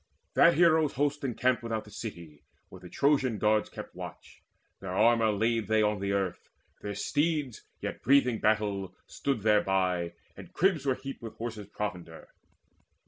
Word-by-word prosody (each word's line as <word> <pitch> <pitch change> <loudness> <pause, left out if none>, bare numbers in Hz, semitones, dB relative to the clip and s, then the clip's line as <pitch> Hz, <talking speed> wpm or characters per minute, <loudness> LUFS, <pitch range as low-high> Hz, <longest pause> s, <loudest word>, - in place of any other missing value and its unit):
That - - +6
hero's 160 -2 +4
host 145 +1 -1
encamped 130 0 +1
Without 115 -2 -3
the 105 - -15
city, 85 -11 -8 0.3
where - - -12
the - - -12
Trojan 135 -5 +2
guards 105 0 +2
Kept - - -9
watch. - - -10 0.4
Their 95 -1 -5
armour 115 +1 +4
laid 110 +1 0
they 110 0 +3
on 105 -1 +1
the 100 0 -2
earth; 95 -3 -2 0.3
Their 100 -1 -5
steeds, 145 -5 -1 0.2
yet - - -5
breathing 125 -4 +3
battle, 105 -3 0
stood 135 -6 -2
thereby, 95 -5 +1 0.2
And - - -12
cribs 170 -7 +1
were 130 - +2
heaped 135 +1 -8
with 115 -2 -8
horses' 110 -3 -6
provender. 90 -6 -6
110 Hz, 155 wpm, -29 LUFS, 100-135 Hz, 0.4 s, That